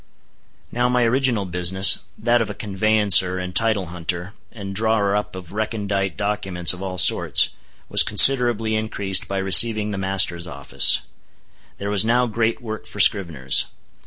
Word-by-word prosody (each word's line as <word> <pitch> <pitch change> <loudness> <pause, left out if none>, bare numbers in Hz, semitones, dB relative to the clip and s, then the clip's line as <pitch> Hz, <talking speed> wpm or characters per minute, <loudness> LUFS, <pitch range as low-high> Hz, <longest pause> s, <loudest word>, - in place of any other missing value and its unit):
Now 120 +1 -2
my 125 0 -1
original 120 -3 -1
business—that 95 +6 +1
of 115 - -4
a - - -8
conveyancer 100 -2 +1
and 90 -1 -8
title 110 -2 -1
hunter, 90 +2 -7 0.2
and 100 -4 -10
drawer 105 -1 -1
up 105 -2 -5
of 90 -1 -12
recondite 100 -3 -5
documents 100 -4 -2
of 90 - -12
all 95 -1 -7
sorts—was 90 - +1
considerably 120 -5 +3
increased 100 -3 -1
by 100 - -6
receiving 105 +3 +4
the 100 - -6
master's 95 -3 -1
office. - - +1 0.8
There 100 +1 -6
was 100 -2 0
now 120 +2 0
great 115 0 -4
work 110 -2 -9
for 105 - -12
scriveners. 80 -11 +2
100 Hz, 140 wpm, -19 LUFS, 95-110 Hz, 0.8 s, receiving